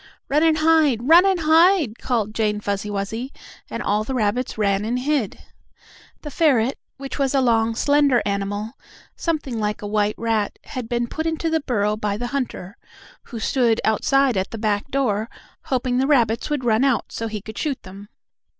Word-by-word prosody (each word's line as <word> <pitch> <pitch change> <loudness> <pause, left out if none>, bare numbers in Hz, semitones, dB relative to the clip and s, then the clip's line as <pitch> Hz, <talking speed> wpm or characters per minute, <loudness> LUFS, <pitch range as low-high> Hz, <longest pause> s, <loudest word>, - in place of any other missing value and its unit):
"Run 295 +2 +2
and 320 -1 +3
hide! 310 -7 +3
Run 345 +5 +7
and 375 -3 +1
hide!" 320 - +4
called 220 -4 -1
Jane 210 -2 0
Fuzzy 205 0 -3
Wuzzy, 215 +6 -4 0.4
and - - -4
all 210 +1 +1
the 260 +4 -4
rabbits 235 +2 -1
ran 200 -1 +1
and 235 +3 -1
hid. 265 -5 -1 0.9
The 295 - -6
ferret, 270 -5 +2 0.2
which 275 +1 -7
was 275 0 +1
a - - +4
long, 230 -3 +2
slender 285 -2 +3
animal, 205 +2 -2 0.4
something 295 -8 -2
like 210 0 -2
a - - -3
white 210 0 0
rat, 225 -3 -1
had 250 -3 -7
been 240 0 0
put 315 +7 -4
into 325 0 -1
the 320 - +2
burrow 210 -6 0
by 210 -2 -2
the 245 - -4
hunter, 235 -7 -4 0.5
who 235 - -7
stood 235 -1 +1
outside 265 +4 +2
at 190 - -1
the 225 - -7
back 210 +1 -1
door, 230 -5 0 0.4
hoping 255 -1 0
the 265 - +1
rabbits 235 -5 +2
would 290 -4 -2
run 225 +1 +3
out 270 -5 +1
so 225 - -4
he 215 -1 -4
could 220 +2 -9
shoot 290 -4 -3
them. 195 +2 -12
235 Hz, 185 wpm, -22 LUFS, 210-275 Hz, 0.9 s, Run